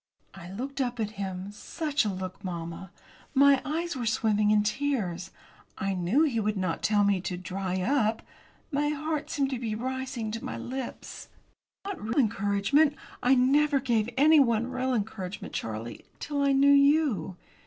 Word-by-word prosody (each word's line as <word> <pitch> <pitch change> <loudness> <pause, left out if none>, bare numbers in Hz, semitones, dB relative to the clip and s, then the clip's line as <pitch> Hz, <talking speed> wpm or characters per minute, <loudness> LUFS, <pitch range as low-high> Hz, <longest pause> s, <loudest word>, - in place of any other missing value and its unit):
I 175 -2 -10
looked 270 +7 -4
up 245 -2 -2
at 215 -1 -1
him 190 0 -4
such 290 +5 -2
a - - +1
look, 185 0 -6
mamma! 170 0 -5 0.5
My 275 0 +6
eyes 330 +3 -2
were 245 -3 -3
swimming 215 -2 +2
in 210 0 +4
tears. 210 -7 -1 0.5
I 195 0 -1
knew 185 - +2
he 260 -8 +1
would 210 -1 -1
not 185 -3 -2
tell 210 -1 +3
me 200 -2 +2
to 180 0 -4
"dry 185 +1 -3
up." 225 -1 +1 0.5
My 295 +1 +1
heart 305 0 -2
seemed 275 -1 0
to 260 - -2
be 225 -3 -3
rising 255 -2 -3
to 230 +1 -5
my - - -4
lips. 260 0 -6 0.6
"Not 400 -2 -5
real 220 +4 -3
encouragement. 225 +6 +2 0.3
I 255 +2 +4
never 280 +3 +3
gave 235 -4 0
anyone 265 -5 +4
real 255 0 0
encouragement, 200 -3 -4
Charlie, 115 +1 -5 0.2
till 290 -1 -2
I 280 0 +3
knew 280 +1 +5
you. 280 - +3
230 Hz, 165 wpm, -28 LUFS, 195-280 Hz, 0.6 s, My